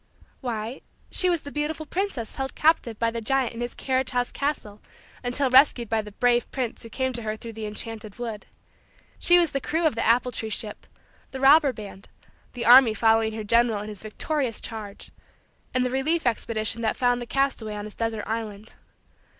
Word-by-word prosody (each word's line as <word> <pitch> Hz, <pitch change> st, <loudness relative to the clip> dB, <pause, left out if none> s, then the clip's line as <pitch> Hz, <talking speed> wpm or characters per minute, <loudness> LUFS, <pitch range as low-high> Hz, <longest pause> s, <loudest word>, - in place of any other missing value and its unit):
Why, 235 Hz, -1 st, -4 dB, 0.3 s
she 365 Hz, -, +3 dB
was 340 Hz, -3 st, +1 dB
the 285 Hz, -, -9 dB
beautiful 300 Hz, +2 st, -3 dB
princess 325 Hz, -, -3 dB
held 270 Hz, 0 st, -4 dB
captive 300 Hz, -8 st, +2 dB
by 230 Hz, 0 st, +1 dB
the 230 Hz, 0 st, -4 dB
giant 260 Hz, +1 st, 0 dB
in 230 Hz, -, -7 dB
his 240 Hz, 0 st, -4 dB
carriage 260 Hz, -1 st, 0 dB
house 245 Hz, -1 st, -1 dB
castle 280 Hz, -8 st, -3 dB, 0.4 s
until 250 Hz, +2 st, +2 dB
rescued 255 Hz, -3 st, +5 dB
by 225 Hz, -1 st, +1 dB
the 210 Hz, 0 st, -10 dB
brave 240 Hz, +1 st, +2 dB
prince 250 Hz, -4 st, -4 dB
who 230 Hz, -, -10 dB
came 260 Hz, +2 st, -2 dB
to 235 Hz, -, -3 dB
her 215 Hz, -1 st, -3 dB
through 230 Hz, +1 st, -9 dB
the 220 Hz, -1 st, -5 dB
enchanted 215 Hz, 0 st, -5 dB
wood. 225 Hz, -3 st, -6 dB, 0.7 s
She 350 Hz, -, +5 dB
was 340 Hz, -3 st, +3 dB
the 275 Hz, -, -2 dB
crew 325 Hz, +5 st, -1 dB
of 315 Hz, -, +3 dB
the 225 Hz, -, -2 dB
apple 245 Hz, +2 st, +3 dB
tree 225 Hz, -2 st, -4 dB
ship; 215 Hz, 0 st, -5 dB, 0.4 s
the 265 Hz, -, -7 dB
robber 280 Hz, +1 st, +6 dB
band; 205 Hz, -4 st, -10 dB, 0.4 s
the 240 Hz, -2 st, -4 dB
army 240 Hz, -2 st, +8 dB
following 225 Hz, 0 st, +3 dB
her 220 Hz, 0 st, -5 dB
general 230 Hz, -1 st, +2 dB
in 210 Hz, -, -7 dB
his 210 Hz, -2 st, -8 dB
victorious 245 Hz, +2 st, -2 dB
charge; 210 Hz, -3 st, -7 dB, 0.6 s
and 255 Hz, 0 st, +1 dB
the 250 Hz, -, -1 dB
relief 305 Hz, +5 st, 0 dB
expedition 230 Hz, -1 st, 0 dB
that 220 Hz, -, 0 dB
found 245 Hz, -1 st, +2 dB
the 240 Hz, -, -6 dB
castaway 255 Hz, -5 st, -1 dB
on 205 Hz, 0 st, -5 dB
his 215 Hz, -, -8 dB
desert 225 Hz, -2 st, -3 dB
island. 220 Hz, -1 st, -5 dB
235 Hz, 195 wpm, -25 LUFS, 220-270 Hz, 0.7 s, army